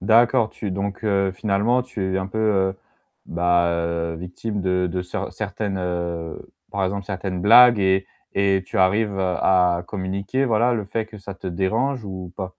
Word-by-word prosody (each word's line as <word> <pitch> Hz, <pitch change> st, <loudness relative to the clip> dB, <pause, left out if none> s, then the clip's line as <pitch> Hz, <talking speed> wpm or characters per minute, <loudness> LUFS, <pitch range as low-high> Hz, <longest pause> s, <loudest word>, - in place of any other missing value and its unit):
D'accord, 115 Hz, 0 st, +4 dB
tu 100 Hz, -, -5 dB
donc, 100 Hz, +2 st, -3 dB
heu, 100 Hz, -2 st, +1 dB
finalement, 105 Hz, +6 st, +1 dB
tu 95 Hz, -7 st, -3 dB
es -, -, +1 dB
un 95 Hz, -, -3 dB
peu, 105 Hz, +3 st, -5 dB
heu, 95 Hz, -3 st, +1 dB, 0.5 s
ben, 85 Hz, -1 st, 0 dB
victime 95 Hz, +4 st, -5 dB
de 90 Hz, -1 st, +1 dB
de 90 Hz, +1 st, -2 dB
ce 90 Hz, -, -5 dB
certaines, 100 Hz, -2 st, -4 dB
heu, 85 Hz, -2 st, -3 dB, 0.3 s
par 100 Hz, -1 st, -1 dB
exemple, 100 Hz, +1 st, -2 dB
certaines 95 Hz, -2 st, -4 dB
blagues 120 Hz, +3 st, +8 dB
et 95 Hz, 0 st, +2 dB, 0.3 s
et 95 Hz, -1 st, +2 dB
tu -, -, -5 dB
arrives 100 Hz, +2 st, +2 dB
à 90 Hz, -1 st, +2 dB
communiquer, 100 Hz, +6 st, -2 dB
voilà, 120 Hz, 0 st, +2 dB
le 105 Hz, -3 st, -2 dB
fait 110 Hz, +2 st, -3 dB
que 110 Hz, -1 st, -12 dB
ça 100 Hz, -1 st, -8 dB
te 95 Hz, -, -10 dB
dérange 110 Hz, +8 st, -1 dB
ou 95 Hz, -2 st, -7 dB
pas? 95 Hz, -2 st, -5 dB
95 Hz, 170 wpm, -22 LUFS, 90-105 Hz, 0.5 s, blagues